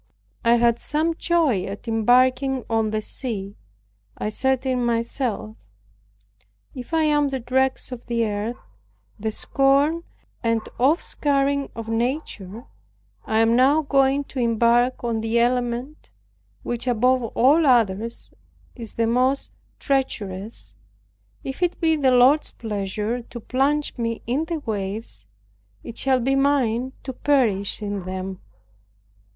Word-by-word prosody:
I 235 0 +5
had 235 0 +3
some 315 +3 0
joy 320 - +1
at 200 +4 -8
embarking 255 +3 +2
on 225 -1 +1
the 215 0 -2
sea. 205 -7 -3 0.6
I - - -2
said 265 +4 0
in 255 -2 0
myself, 230 - -2 1.2
"If 250 +2 -9
I 325 -1 +2
am 295 -1 +3
the 270 -1 -3
dregs 260 +2 0
of 245 -1 -8
the 235 -1 +1
earth, 210 +3 -3 0.6
the 220 +1 -1
scorn 280 +8 +2 0.4
and 230 -1 +1 0.2
offscouring 280 -1 +1
of 230 -1 -6
nature, 230 -3 -3 0.6
I 220 0 +2
am 225 +1 +4
now 280 +5 +4
going 275 0 +2
to 270 - -7
embark 235 +2 +2
on 230 -2 -1
the 225 +1 0
element 245 +4 -1 0.5
which 240 +1 -3
above 250 +2 +3
all 280 +7 +3
others 230 -2 +1 0.4
is 230 -3 -8
the 230 - +1
most 255 +4 +1 0.3
treacherous; 220 -7 -2 0.7
if 270 +5 -6
it 355 -1 0
be 320 -2 +3
the 280 -4 +2
Lord's 255 +4 +5
pleasure 210 +2 -3
to 240 +1 -10
plunge 275 +5 0
me 230 -1 -2
in 265 +7 0
the 325 -2 -4
waves, 195 - -5 0.6
it 230 - -8
shall 265 -1 +2
be 265 +3 +1
mine 265 -3 +1
to 260 - -5
perish 225 -8 +1
in 200 -3 -4
them." 185 0 -5
245 Hz, 130 wpm, -23 LUFS, 225-270 Hz, 1.2 s, I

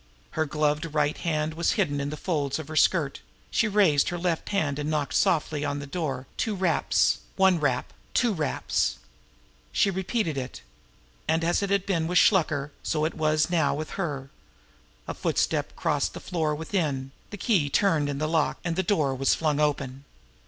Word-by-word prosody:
Her 160 0 -1
gloved 150 +2 0
right 150 0 +2
hand 155 -2 -1
was 170 +1 +1
hidden 145 -9 0
in 140 - -2
the 150 - -5
folds 145 -6 -1
of 155 -2 -7
her 155 - -6
skirt; 155 -2 +2 0.3
she 230 - +2
raised 195 -9 +3
her 175 - -3
left 170 -2 -1
hand 150 -8 0
and 150 +1 -2
knocked 150 -2 -1
softly 155 -2 +2
upon 145 -1 -1
the 140 - -5
door 140 -4 -3
two 220 -2 -1
raps, 185 -3 +2 0.2
one 190 -3 +4
rap, 130 -4 0 0.2
two 240 -3 +3
raps. 155 -6 0 0.7
She 195 - +3
repeated 190 - -1
it. 125 - -7 0.6
And 165 +1 +2
as 175 +3 +2
it 200 - -1
had 200 -1 +1
been 165 -5 0
with 180 +1 +1
Shluker, 155 -8 +3
so 155 -1 0
it 160 - -1
was 155 +1 +1
now 160 -6 +2
with 155 +1 -5
her. 140 -8 -4 0.8
A - - -3
footstep - - -1
crossed - - 0
the - - -5
floor 160 -4 -1
within, 150 -5 -2 0.2
the 205 - -7
key 185 - +2
turned 160 -4 +2
in 140 - -2
the 155 +2 -1
lock, 160 -1 +1
and 170 -2 -1
the 190 - +2
door 160 -8 +1
was 135 +1 +2
flung 150 -2 0
open. 140 -3 -1
155 Hz, 185 wpm, -26 LUFS, 145-175 Hz, 0.8 s, one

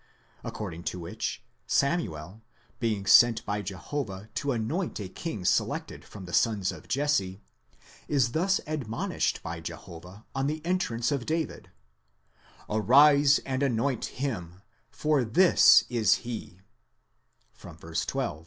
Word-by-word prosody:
according 85 -6 -6
to 90 - -3
which 85 - -5 0.2
Samuel, 105 - -1 0.4
being 110 -4 -1
sent 120 +3 +6
by 105 0 -2
Jehovah 100 +1 -5
to 140 - -1
anoint 125 - -2
a 100 - -5
king 100 - -6
selected - - -1
from 100 -3 -11
the 90 - -9
sons 105 -5 +2
of - - -12
Jesse, 140 -9 0 0.7
is 135 -5 +2
thus 190 +7 +1
admonished 135 -8 -2
by 85 0 -5
Jehovah 85 +4 -10
on 135 0 -1
the 155 +2 -2
entrance 150 -10 0
of 140 -4 -2
David: 160 0 -3 1.0
Arise 140 +6 +5
and 130 0 -2
anoint 130 -1 0
him, 95 -9 -5 0.3
for 150 -3 +1
this 175 +11 +6
is 115 -5 +3
he 110 -6 -7 0.9
(vy. 80 -1 -12
12). 120 - -2
115 Hz, 125 wpm, -28 LUFS, 95-140 Hz, 1.0 s, sent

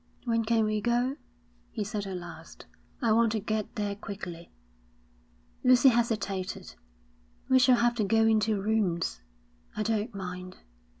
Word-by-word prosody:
'When 230 -1 +1
can 225 -1 +2
we 215 0 0
go?' 245 +4 +1 0.5
he 210 - -3
said 205 0 -4
at 190 -1 -4
last. 175 -1 -11 0.4
'I 230 - +3
want 230 0 +4
to 220 - 0
get 215 0 -3
there 205 -1 -2
quickly.' 185 -4 -8 1.1
Lucy 255 +1 +7
hesitated. 215 -6 -1 0.8
'We 260 - +6
shall 250 -1 +5
have 240 0 +3
to 220 - +1
go 225 +3 +3
into 215 -1 +2
rooms.' 195 - 0 0.6
'I 215 - 0
don't 220 +1 -1
mind.' 185 -1 -6
215 Hz, 140 wpm, -29 LUFS, 195-230 Hz, 1.1 s, Lucy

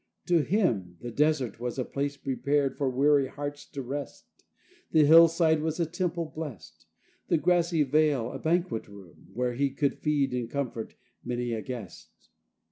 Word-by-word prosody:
To 175 -2 +3
him 120 - 0
the 120 - -6
desert 140 -5 +1
was 125 +1 -4
a 130 - -1
place 140 0 -3
prepared 140 +1 0
For 140 -2 0
weary 140 +1 +3
hearts 145 +1 -6
to 140 -3 -6
rest; 140 +3 -6 0.6
The 155 -2 +5
hillside 165 0 +6
was 160 +1 -2
a 170 - +2
temple 170 0 -2
blest; 150 - -9 0.4
The - - +3
grassy 170 0 +2
vale 145 -4 +2
a - - -6
banquet 170 -6 0
room 100 -5 -15
Where 125 0 0
he 140 +3 +1
could 140 +1 -1
feed 145 -4 +1
and 120 -2 -2
comfort 125 -5 -4 0.3
many 120 -1 -2
a 110 - -2
guest. 115 -7 -9
140 Hz, 160 wpm, -28 LUFS, 125-160 Hz, 0.6 s, hillside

